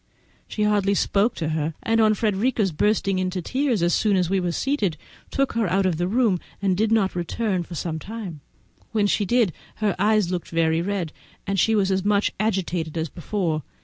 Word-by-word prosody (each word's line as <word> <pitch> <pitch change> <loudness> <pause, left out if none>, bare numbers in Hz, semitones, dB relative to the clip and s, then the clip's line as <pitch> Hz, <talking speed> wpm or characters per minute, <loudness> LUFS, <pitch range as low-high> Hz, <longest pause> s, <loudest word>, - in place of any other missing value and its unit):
She 210 - -2
hardly 205 -1 +2
spoke 205 +4 +2
to 155 - -2
her, 155 0 -2
and 225 0 +2
on 215 -1 +4
Frederica's 210 0 +1
bursting 195 +2 +1
into 185 0 -1
tears 255 - 0
as 175 - +2
soon 210 -2 +2
as 180 -1 0
we 195 - +2
were 180 -1 -1
seated, 205 - 0 0.3
took 275 -1 0
her 230 -3 +1
out 190 +2 +1
of 180 -4 +1
the 175 +1 0
room, 220 -3 +2 0.2
and 195 -2 +1
did 220 +3 +1
not 215 -4 +2
return 185 +2 -1
for 170 0 -8
some 160 0 -3
time. 200 -5 -7 0.5
When 210 -2 +2
she 205 0 +1
did, 230 -4 +2 0.2
her 210 -4 0
eyes 210 -2 +3
looked 180 -2 -3
very 165 0 +1
red 185 -3 -2 0.3
and 195 -1 -1
she 225 +4 +3
was 195 -2 +2
as 190 -1 +1
much 205 0 +2
agitated 180 -6 -1
as 160 -1 -2
before. 170 -2 -2
195 Hz, 200 wpm, -24 LUFS, 175-215 Hz, 0.5 s, on